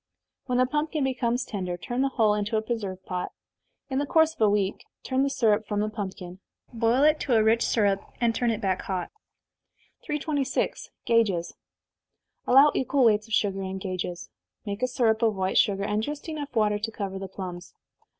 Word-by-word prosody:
When 250 -1 0
the 255 - +4
pumpkin 300 +2 -1
becomes 250 -1 0
tender, 185 -6 -4
turn 245 +8 -3
the 275 - +2
whole 220 -5 +2
into 210 +1 -1
a - - +1
preserve 200 -5 -4
pot. 180 -1 -4 0.5
In 265 -1 -1
the 285 - -1
course 320 +2 +4
of 320 - -16
a 215 - +5
week, 200 -1 0 0.2
turn 260 0 0
the 275 - +2
syrup 215 -5 +2
from 205 -1 -1
the 210 +1 0
pumpkin, 190 -3 -6 0.3
boil 230 +3 +2
it 305 +1 +4
to 250 - +1
a 220 - +5
rich 225 +1 +3
syrup, 200 -3 +2 0.2
and 235 -1 +2
turn 240 +1 0
it 225 -1 -1
back 190 -3 0
hot. 185 -2 -4 0.9
326. 295 -2 -2 0.2
Gages. 200 -7 +2 0.9
Allow 275 +4 +7
equal 265 0 +2
weights 215 -1 +3
of 225 - -8
sugar 195 -2 +1
and 190 0 -4
gages. 185 -2 -5 0.3
Make 200 +1 -4
a 255 - +2
syrup 235 -3 +1
of 225 -2 +2
white 190 0 +1
sugar, 200 -1 +2
and 210 +1 0
just 295 +7 -5 0.3
water 215 -2 +3
enough 210 +1 -1
to 225 - -7
cover 195 -3 -4
the 195 - -5
plums. 180 -2 -8
220 Hz, 190 wpm, -26 LUFS, 195-255 Hz, 0.9 s, Allow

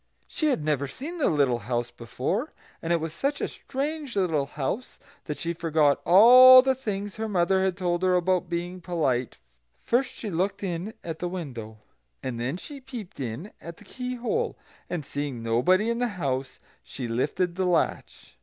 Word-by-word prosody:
She 310 - -1
had 210 - 0
never 145 -2 0
seen 305 - -7
the 295 - +3
little 140 -6 +2
house 120 +2 -2
before, 130 - -3 0.3
and 165 - -3
it 170 - +3
was 160 0 -4
such 280 +10 -1
a - - -1
strange 285 -1 -4
little 165 -8 +1
house 150 - -4 0.3
that 150 - -4
she 170 0 -2
forgot 155 -4 +2
all 255 +7 +9
the 265 0 +3
things 205 -6 -4
her 220 0 -3
mother 190 0 +2
had 190 -2 0
told 175 -2 -1
her 185 -1 +3
about 180 0 +1
being 175 +1 -4
polite: 145 -9 -1 0.5
first 250 +2 +1
she 215 - -6
looked 190 +4 -1
in 185 +3 -4
at 165 -1 -5
the 175 - -2
window, 125 -12 -6 0.5
and 120 -3 -4
then 130 +8 -2
she 280 - -9
peeped 240 - -9
in 135 - -5
at 170 0 -9
the 210 - -16
keyhole; 250 - -3 0.3
and 170 -5 -3
seeing 140 -4 -4
nobody 130 - +2
in 235 - -2
the 245 - +1
house, 135 -4 -2 0.2
she 125 -3 -6
lifted 130 +9 -1
the 185 +1 -1
latch. 175 -2 -1
175 Hz, 180 wpm, -26 LUFS, 145-220 Hz, 0.5 s, all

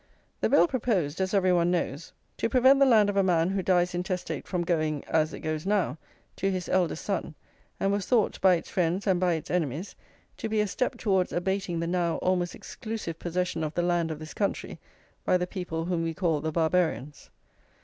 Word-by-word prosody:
The - - +1
bill - - +5
proposed, 195 - -1
as 190 0 0
every 185 -3 +3
one 175 -1 +3
knows, 170 -4 -2 0.3
to 230 - 0
prevent 260 +2 +5
the 275 - +6
land 220 -5 +5
of 205 -1 -1
a - - +6
man 175 -2 +2
who 195 0 0
dies 180 -1 +2
intestate 180 +1 -3
from 180 -2 -1
going, 155 -4 0
as 155 0 +1
it - - -8
goes 155 -1 -3
now, 190 - 0 0.4
to 195 - 0
his 185 -2 -3
eldest 175 -3 0
son, 185 -6 -2 0.4
and 195 - +1
was 200 -2 -1
thought, 235 -5 +1
by 185 -2 +6
its 165 - -5
friends 180 +2 0
and 190 -3 +2
by 180 -1 +2
its 160 -2 -4
enemies, 165 +1 -2 0.4
to 225 - -4
be 215 0 0
a 210 - +3
step 250 +5 -2
towards 190 -5 +1
abating 180 -1 -1
the - - -1
now 170 -1 0
almost 180 -1 0
exclusive 215 -8 -6
possession 175 -1 -2
of 155 0 -4
the 175 - +1
land 175 -2 +1
of 160 - -4
this 155 +1 -9
country 200 - -2 0.4
by 180 - +3
the 180 - -1
people 175 -3 -4
whom 175 -1 -1
we 165 -1 -2
call 165 -5 0
the 160 +1 -2
Barbarians. 160 -3 0
180 Hz, 210 wpm, -27 LUFS, 165-195 Hz, 0.4 s, the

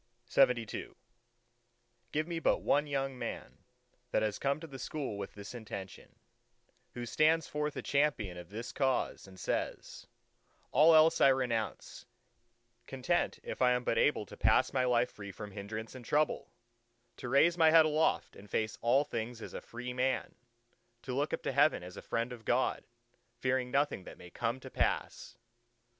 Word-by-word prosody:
LXXIII 125 -5 +2 1.2
Give 155 +2 -1
me 170 -1 -3
but - - +1
one 145 +1 +2
young 135 -2 -2
man, - - -6 0.5
that 110 - +1
has 105 -1 -1
come 140 +2 0
to 165 - -8
the 135 -4 -9
School 135 -3 -4
with 100 -1 -6
this 100 +2 -8
intention, 100 -5 -8 0.8
who 120 -1 -4
stands 155 +7 +3
forth 150 0 -2
a - - -4
champion 140 -10 +1
of 90 -1 -10
this 115 +4 -6
cause, 130 -6 -1
and 95 -1 -14
says, - - -3 0.6
"All 160 +4 +6
else 160 +1 +5
I - - +8
renounce, 125 -5 -1 0.8
content 135 +6 0
if - - -6
I 125 -1 +5
am 125 0 -1
but 115 - +1
able 130 -7 +2
to - - -11
pass - - +3
my 130 -1 +2
life 125 0 +2
free 100 -1 -8
from 105 +2 -8
hindrance 110 +3 -6
and 130 -1 -10
trouble; 150 +5 0 0.7
to 120 - -6
raise 150 +6 +5
my 165 -2 +5
head 160 0 +7
aloft 155 +1 +1
and 100 +1 -14
face 110 +1 -1
all 125 +5 +4
things 115 -4 -4
as - - -8
a - - -5
free 125 +1 -7
man; 130 +1 0 0.7
to 130 - -4
look 145 +3 0
up - - -3
to - - -1
heaven - - +3
as 90 0 -9
a - - -8
friend 115 +2 -2
of 115 -2 -11
God, - - 0 0.5
fearing 130 -1 0
nothing 140 -7 0
that - - -10
may 90 - -13
come 120 +5 -2
to 130 - -10
pass!" - - -2
125 Hz, 175 wpm, -32 LUFS, 110-145 Hz, 1.2 s, I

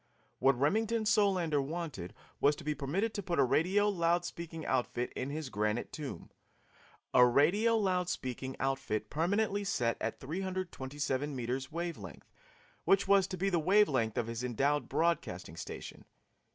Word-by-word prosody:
What 135 -2 +4
Remington 220 - +1
Solander 190 -9 +3
wanted 140 - -5 0.2
was 145 +1 +4
to - - -10
be 150 - 0
permitted 160 +11 -1
to 205 - -3
put 175 -2 -2
a 140 - +5
radio 185 +10 +3
loud 175 -3 +1
speaking 165 -2 -6
outfit 125 -1 -1
in 130 - -3
his 150 -1 -4
granite 105 +1 -1
tomb 145 -4 -7 0.8
a 125 - +7
radio 175 - +4
loud 185 -4 +1
speaking 130 -4 -4
outfit 115 -5 -2
permanently 200 +6 +1
set 120 -12 0
at - - -2
327 145 -5 -3
meters 130 +2 -3
wave 170 +1 -3
length, - - -11 0.5
which 195 0 +3
was 195 -1 +5
to 185 - -5
be 195 +2 0
the 175 - +2
wave 200 +6 +5
length 115 -6 0
of 120 - +1
his 115 +1 -4
endowed 135 +2 0
broadcasting 140 - -1
station. - - -8
155 Hz, 155 wpm, -32 LUFS, 130-190 Hz, 0.8 s, a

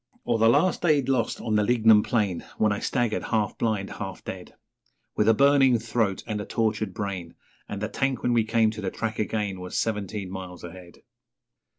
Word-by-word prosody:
Or 120 -2 +1
the 115 +1 +5
last 185 +10 +3
day 155 -4 +4
lost 125 -3 0
on 110 - -1
the 105 - +3
lignum 110 -1 +5
plain, 105 -6 -1
When 110 -1 +2
I 100 - -1
staggered, 120 -4 -1
half 110 -2 0
blind, 105 -4 -1
half 95 -2 -7
dead, 90 -1 -8 0.6
With 105 +1 +3
a 115 - +5
burning 135 -1 +5
throat 110 -4 -1
and 105 -2 -3
a - - -6
tortured 110 -3 -1
brain; 95 -3 -5 0.3
And 100 0 -5
the - - 0
tank 135 -1 -2
when 120 - +2
we 115 -1 +3
came 110 0 +2
to 110 0 -7
the 95 - -2
track 110 +2 -4
again 105 -3 -2
Was 90 0 -5
seventeen 105 -3 -2
miles 90 -2 -8
ahead. 85 0 -12
110 Hz, 195 wpm, -26 LUFS, 100-115 Hz, 0.6 s, the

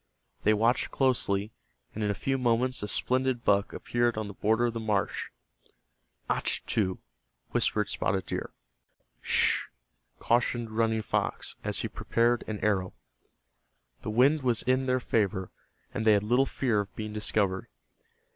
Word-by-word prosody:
They 110 +1 +4
watched 115 +4 +2
closely, 110 -6 +1 0.4
and 110 - -3
in 105 - +1
a 100 - 0
few 135 +4 -1
moments 125 +1 +2
a 105 - -3
splendid 130 +2 0
buck 100 0 +3
appeared 120 -1 0
on 110 -1 -2
the 100 - -7
border 110 +4 +2
of 120 - 0
the 115 - -3
marsh. 105 -3 -1 1.0
"Achtu," 95 -4 0 0.5
whispered 105 -2 +1
Spotted 95 -3 -1
Deer. - - -4 0.7
"Sh," - - +2 0.5
cautioned 120 -1 +1
Running 110 0 +1
Fox, - - -2
as - - -1
he - - -2
prepared 120 +1 +1
an 110 - -3
arrow. 95 -3 0 1.1
The - - -4
wind 135 +8 +4
was 120 -4 +1
in 130 +1 +1
their 130 0 +2
favor, 100 -6 0 0.4
and 110 - -2
they 110 -1 +6
had 100 -1 +2
little 125 +5 +3
fear 120 -6 0
of 100 -2 -5
being 110 -1 -5
discovered. 100 -3 0
110 Hz, 145 wpm, -29 LUFS, 105-120 Hz, 1.1 s, they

